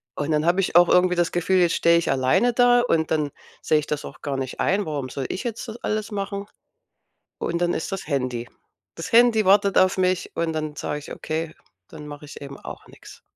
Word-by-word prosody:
Und 145 +2 -2
dann 150 0 +1
habe 175 +3 +3
ich 180 - -3
auch 175 0 +7
irgendwie 180 0 +4
das 175 0 +1
Gefühl, 180 +2 +2
jetzt 175 -2 +3
stehe 170 0 +4
ich 170 - 0
alleine 130 - +2
da 245 0 +5
und 165 -10 0
dann 150 -2 0 0.3
sehe 155 - +2
ich 145 - -6
das 150 -1 -3
auch - - -11
gar 140 -2 -3
nicht 130 -1 -5
ein. 200 +2 +1
Warum 145 -4 -3
soll 135 +1 -4
ich 190 - -4
jetzt 235 +1 -4
das 220 - -7
alles 215 +1 -2
machen? 200 0 -4 0.9
Und 170 - -2
dann 175 0 +1
ist 175 - -4
das 195 - -4
Handy. 125 -4 -2 0.5
Das 165 - -7
Handy 230 -2 +5
wartet 200 0 +4
auf 185 +1 +3
mich 185 -1 0
und 165 -1 -1
dann 155 -1 -4
sage 150 - -3
ich: 145 - -9
„Okay, 160 0 -4 0.3
dann 150 -2 -10
mache 145 0 -9
ich - - -11
eben 140 -1 -9
auch - - -10
nix.“ - - -15
170 Hz, 225 wpm, -23 LUFS, 150-195 Hz, 0.9 s, auch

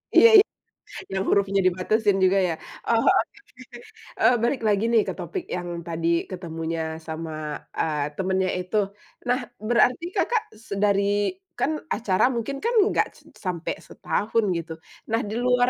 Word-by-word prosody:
Iya 465 - +9
iya, 410 - +6 0.7
yang 190 - 0
hurufnya 195 -1 +3
dibatasin 195 +3 +2
juga, 190 +1 +4
ya? 165 - -1 0.4
Oh, 230 -1 +3
oke - - 0 0.4
oke. 245 -1 -12 0.4
Eee, 245 - +5
balik 245 +1 +1
lagi, 205 0 +2
nih, 230 - +5
ke - - -2
topik 375 -4 -4
yang 175 0 -4 0.2
tadi 165 0 -2 0.2
ketemunya 165 -3 -4
sama, 160 0 -5 0.5
eee, 150 -2 0
temannya 190 0 +1
itu. 180 +4 -2 0.5
Nah, 245 +2 +2 0.3
berarti 250 +6 +3
Kakak 465 -2 +1 0.2
se - - -6
dari 200 - +2 0.3
kan, 305 - +2 0.2
acara 205 -1 +2
mungkin, 235 +4 -2
kan, 470 +2 +1
nggak - - +2
s - - -18 0.3
sampai 175 -2 -2
setahun, 225 +2 -1
gitu. 165 -1 -5 0.4
Nah, 225 - +2
di 215 - -4
luar 250 0 +3
200 Hz, 155 wpm, -25 LUFS, 175-235 Hz, 0.7 s, Iya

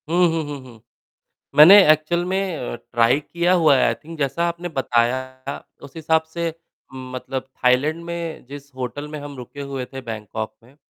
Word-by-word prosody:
हुँ, 175 +1 +4
हुँ, 160 -1 -1
हुँ, 145 -1 -6
हुँ। 120 -4 -15 0.7
मैंने 155 +7 +10 0.2
एक्चुअल 155 +3 +1
में 190 -2 -1
अ, 125 - -5
ट्राई 120 +2 +1
किया 170 +4 0
हुआ 160 -5 +5
है - - +3
आई - - +2
थिंक 165 +1 -12
जैसा 140 +4 0
आपने 170 +1 -5
बताया 130 0 -1 0.2
उस 140 +1 -12
हिसाब 160 0 +2
से 170 0 -1 0.5
मतलब, 130 0 -5 0.2
थाईलैंड 145 +7 +2
में 170 -3 -5
जिस 140 +2 -11
होटल 130 +3 -5
में 150 0 -7
हम 145 0 -8
रुके 130 +3 -9
हुए 135 -2 -5
थे 135 - -6
बैंगकॉक 110 -2 -6
में 125 +4 -21
140 Hz, 175 wpm, -22 LUFS, 130-165 Hz, 0.7 s, मैंने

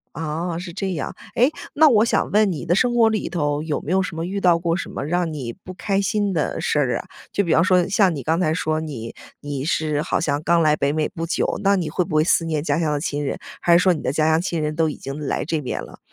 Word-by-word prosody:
啊， 165 +2 -3
是 175 0 -7
这 195 +1 -3
样。 150 -6 -4 0.2
诶， 250 +5 +4 0.2
那 315 +1 +6
我 220 -4 +5
想 - - 0
问 210 -1 +4
你 165 -1 -5
的 175 +1 +2
生 240 +4 +2
活 235 -2 +5
里 220 -1 -2
头 145 -4 -1
有 155 -2 -2
没 155 - -5
有 190 +1 +3
什 185 -3 -4
么 165 +1 -3
遇 195 +3 -3
到 175 -3 +4
过 170 -1 0
什 180 - -4
么 - - -5
让 175 +1 0
你 125 -6 -5
不 185 - -8
开 195 +1 -1
心 205 0 0
的 155 -4 -1
事 150 - +1
儿 130 -4 +1
啊？ - - -9 0.3
就 200 - +1
比 165 - +2
方 165 - +4
说 180 -1 +3
像 195 -2 +3
你 140 - -4
刚 160 +2 +1
才 155 -4 +1
说 155 -1 -1
你 125 -8 -6 0.3
你 145 -2 -4
是 155 -2 0
好 - - -1
像 145 -3 -1
刚 170 +2 +3
来 155 -2 +4
北 140 -1 0
美 155 0 0
不 165 - -5
久， 165 - -1
那 200 0 +4
你 170 -4 -2
会 175 +4 0
不 155 - -4
会 155 - +5
思 170 - +3
念 155 -2 -1
家 150 -2 0
乡 160 -3 0
的 145 - 0
亲 145 -1 -2
人？ - - -2 0.2
还 170 -1 +5
是 - - +4
说 185 -1 +4
你 160 - -5
的 - - -1
家 155 +2 +1
乡 160 +1 +3
亲 170 -3 -2
人 150 0 -2
都 160 -1 +2
已 150 - -5
经 135 +1 -6
来 150 - -2
这 160 0 -1
边 130 - -4
了。 - - -11
165 Hz, 305 characters per minute, -22 LUFS, 150-185 Hz, 0.3 s, 那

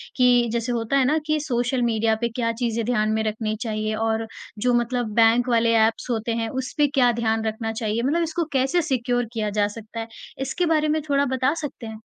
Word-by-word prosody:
कि 245 -2 +4
जैसे 235 +1 -1
होता 235 +3 0
है 265 - +3
ना 300 +4 +2
कि 305 0 +1
सोशल 250 -3 -1
मीडिया 225 -1 +1
पे 235 - +1
क्या 230 0 -1
चीज़ें 230 -1 0
ध्यान 215 -2 +1
में 220 0 0
रखनी 215 0 -2
चाहिए? 215 -2 -2
और 225 0 -1 0.3
जो 250 +2 +2
मतलब 240 -2 0
बैंक 230 +2 +4
वाले 230 -1 +3
ऐप्स 225 +3 -2
होते 230 0 -1
हैं, 225 - -2
उसपे 265 +3 0
क्या 260 -4 +3
ध्यान 225 0 +1
रखना 220 +1 -2
चाहिए? 220 0 -2
मतलब 325 +6 +1
इसको 330 +1 -1
कैसे 270 +7 +2
सिक्योर 245 -3 0
किया 215 -2 -1
जा 205 - +3
सकता 225 +1 -8
है? 225 - -4 0.3
इसके 270 +7 -1
बारे 310 -2 +2
में 310 +1 +1
थोड़ा 280 0 +3
बता 260 0 +1
सकते 280 -5 -6
हैं? 220 0 -9
235 Hz, 210 wpm, -23 LUFS, 225-260 Hz, 0.3 s, कि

